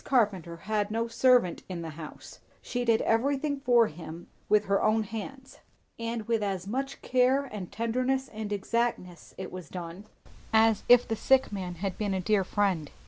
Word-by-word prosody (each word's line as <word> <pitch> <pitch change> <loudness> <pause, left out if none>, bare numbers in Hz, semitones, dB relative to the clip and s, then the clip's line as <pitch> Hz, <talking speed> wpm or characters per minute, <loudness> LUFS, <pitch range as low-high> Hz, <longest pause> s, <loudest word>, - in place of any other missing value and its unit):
Carpenter 195 - +1
had 210 0 0
no 230 +2 -1
servant 235 -5 +3
in 175 -2 -5
the 160 - -5
house; 155 0 -10 0.2
she 245 0 -3
did 230 -2 +3
everything 280 +5 +1
for 245 -3 +4
him 165 -1 -8 0.2
with 210 0 +4
her 200 0 +2
own 220 +1 +3
hands; 240 +6 -8 0.4
and 230 -1 -4
with 230 -2 +1
as 195 -3 -2
much 265 +6 -4
care 255 +2 +3
and 205 -8 -7
tenderness 255 +4 -1
and 215 -1 -6
exactness 205 -3 -2
it 190 - -6
was 180 -5 -8
done 180 +2 -7 0.5
as 220 -1 +4
if 245 0 +7
the 225 - -1
sick 265 +3 +3
man 185 -3 -4
had 190 +1 -4
been 205 -3 0
a - - 0
dear 195 +2 +2
friend. 185 -6 0
215 Hz, 175 wpm, -28 LUFS, 185-240 Hz, 0.5 s, if